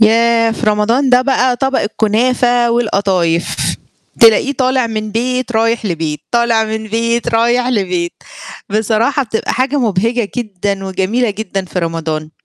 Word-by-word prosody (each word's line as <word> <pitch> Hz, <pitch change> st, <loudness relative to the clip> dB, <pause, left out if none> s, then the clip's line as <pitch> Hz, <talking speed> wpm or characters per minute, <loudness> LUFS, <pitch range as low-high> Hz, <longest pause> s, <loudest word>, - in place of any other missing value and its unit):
ياه! 230 Hz, +1 st, +4 dB
في 225 Hz, -, -4 dB
رمضان 225 Hz, +6 st, +2 dB
ده 250 Hz, 0 st, +5 dB
بقى 255 Hz, -2 st, +1 dB
طبق 270 Hz, 0 st, 0 dB
الكنافة 240 Hz, +3 st, +1 dB
والقطايف 195 Hz, -7 st, 0 dB, 0.6 s
تلاقيه 230 Hz, +5 st, +5 dB
طالع 260 Hz, -2 st, +1 dB
من 215 Hz, -1 st, -4 dB
بيت 250 Hz, +2 st, -1 dB
رايح 225 Hz, 0 st, +1 dB
لبيت، 160 Hz, -4 st, -3 dB
طالع 235 Hz, -2 st, +2 dB
من 220 Hz, 0 st, -4 dB
بيت 230 Hz, +2 st, -1 dB
رايح 240 Hz, +2 st, +2 dB
لبيت 180 Hz, -7 st, -1 dB, 0.6 s
بصراحة 220 Hz, +6 st, +1 dB
بتبقى 225 Hz, -1 st, -3 dB
حاجة 265 Hz, +3 st, 0 dB
مُبهِجَة 225 Hz, 0 st, 0 dB
جدًا 200 Hz, -4 st, -3 dB
وجميلة 205 Hz, +5 st, 0 dB
جدًا 195 Hz, -2 st, -4 dB
في 180 Hz, 0 st, -5 dB
رمضان، 160 Hz, -2 st, -3 dB
225 Hz, 135 wpm, -15 LUFS, 200-245 Hz, 0.6 s, ده